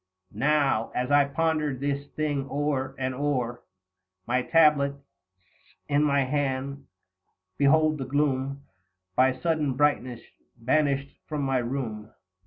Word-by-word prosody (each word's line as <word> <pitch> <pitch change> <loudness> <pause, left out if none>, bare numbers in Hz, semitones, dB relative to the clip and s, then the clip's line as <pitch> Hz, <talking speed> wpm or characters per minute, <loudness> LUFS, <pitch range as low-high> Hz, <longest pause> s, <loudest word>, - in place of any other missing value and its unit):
100 105 - -11
Now, 135 -7 +1
as 125 +2 -1
I 145 0 +5
pondered 155 -2 -1
this 140 0 -2
thing 145 -3 -2
o'er 140 -2 -1
and 130 0 -2
o'er, 130 -3 -2 0.6
My 125 +2 +1
tablets 145 -2 +3 0.9
in 145 0 +2
my 140 -2 +3
hand, 140 0 -2 0.7
behold 155 +2 +4
the 135 - -3
gloom 140 0 -1 0.5
By 130 +1 +4
sudden 155 -5 0
brightness 130 -4 +1 0.4
banished 140 +3 0
from 150 -2 -3
my 135 -1 +1
room, 120 -4 -4
L. - - -28
140 Hz, 125 wpm, -26 LUFS, 130-145 Hz, 0.9 s, I